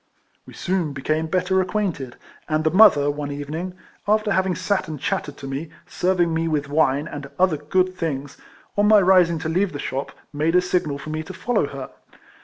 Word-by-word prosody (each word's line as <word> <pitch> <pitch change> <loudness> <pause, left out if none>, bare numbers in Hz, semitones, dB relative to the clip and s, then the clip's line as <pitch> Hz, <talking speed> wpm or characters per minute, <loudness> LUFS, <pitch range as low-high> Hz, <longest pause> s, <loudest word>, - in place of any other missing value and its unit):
We - - -12
soon 180 -5 -1
became 155 +4 -1
better 185 +2 +1
acquainted, 180 - -2 0.3
and 155 0 +1
the 155 - +2
mother, 175 -7 +6
one 145 0 -5
evening, 155 +6 -5 0.3
after 215 0 +2
having 190 -1 +1
sat 190 -1 -1
and 155 -2 -6
chattered 145 +2 -3
to - - -9
me, 140 +4 -4 0.2
serving 175 -2 +1
me 165 0 0
with 150 -3 -1
wine, 145 -1 +2
and 145 -3 -7
other 180 -4 +3
good 185 +5 0
things, 145 -5 -4 0.4
on 205 0 +3
my 215 0 +7
rising 180 -3 +4
to 160 0 -4
leave 180 +3 0
the - - -4
shop, 135 -1 -4 0.2
made 155 +4 +1
a 180 - +6
signal 175 -6 0
for 155 +2 -7
me 155 0 -2
to 180 +3 -9
follow 225 -7 0
her. 135 -2 -8
160 Hz, 195 wpm, -22 LUFS, 145-185 Hz, 0.4 s, my